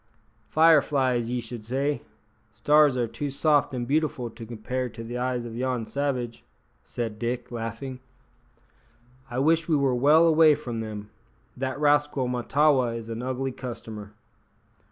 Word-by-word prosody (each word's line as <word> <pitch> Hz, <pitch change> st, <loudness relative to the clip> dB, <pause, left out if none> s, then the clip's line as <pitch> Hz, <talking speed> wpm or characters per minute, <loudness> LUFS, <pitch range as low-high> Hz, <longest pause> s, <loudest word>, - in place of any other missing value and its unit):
"Fire 160 Hz, -1 st, +6 dB
flies, 130 Hz, -5 st, 0 dB
ye 125 Hz, 0 st, -1 dB
should 115 Hz, -1 st, -7 dB
say. 135 Hz, +5 st, -1 dB, 0.5 s
Stars 145 Hz, +5 st, +4 dB
are 120 Hz, -1 st, 0 dB
too 115 Hz, +6 st, -4 dB
soft 145 Hz, +1 st, +2 dB
an' 125 Hz, -2 st, -3 dB
beautiful 135 Hz, -4 st, -1 dB
to 115 Hz, 0 st, -10 dB
compare 125 Hz, +3 st, -3 dB
to 115 Hz, 0 st, -9 dB
the 120 Hz, +2 st, -6 dB
eyes 125 Hz, -1 st, -1 dB
o' -, -, -5 dB
yon 125 Hz, 0 st, -2 dB
savage," 130 Hz, -3 st, -3 dB, 0.4 s
said 115 Hz, -3 st, -5 dB
Dick, 120 Hz, +1 st, -3 dB
laughing. 120 Hz, +3 st, -5 dB, 1.3 s
"I 120 Hz, -, -5 dB
wish 160 Hz, +4 st, +2 dB
we 160 Hz, -, +4 dB
were 135 Hz, -2 st, +2 dB
well 150 Hz, +6 st, +5 dB
away 160 Hz, -2 st, +6 dB
from 120 Hz, -6 st, -5 dB
them. 105 Hz, -2 st, -6 dB, 0.4 s
That 130 Hz, +2 st, -3 dB
rascal 145 Hz, -3 st, +2 dB
Mahtawa 125 Hz, 0 st, +2 dB
is 115 Hz, -1 st, -8 dB
an 115 Hz, +1 st, -4 dB
ugly 130 Hz, +1 st, -2 dB
customer." 110 Hz, -5 st, -8 dB
125 Hz, 150 wpm, -26 LUFS, 115-145 Hz, 1.3 s, Fire